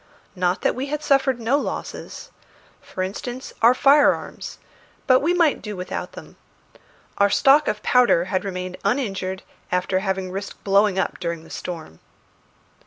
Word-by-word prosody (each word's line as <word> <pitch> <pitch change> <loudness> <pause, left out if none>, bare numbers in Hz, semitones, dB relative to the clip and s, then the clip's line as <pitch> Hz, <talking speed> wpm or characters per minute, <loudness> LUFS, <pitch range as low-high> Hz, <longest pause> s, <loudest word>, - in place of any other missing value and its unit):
Not 180 0 0
that - - +2
we 260 +3 -4
had 300 +1 -3
suffered 270 -3 +2
no 240 +5 +1
losses. - - -6 0.5
For 185 - -5
instance, 245 +7 -6
our 240 +2 +6
firearms; 285 +3 +2 0.5
but 255 -1 +5
we 310 +6 +1
might 340 -4 +2
do 210 -2 -6
without 180 - -5
them. - - -12 0.8
Our 200 0 +5
stock 280 +7 +4
of 210 0 -2
powder 245 -9 +4
had 185 0 -1
remained 185 -2 -5
uninjured 195 -5 -2 0.3
after 180 +1 +1
having 190 -1 -2
risked 195 +2 -7
blowing 200 0 +3
up 190 - -1
during 170 -2 -4
the 165 - -15
storm. 160 - -7
200 Hz, 150 wpm, -22 LUFS, 185-260 Hz, 0.8 s, our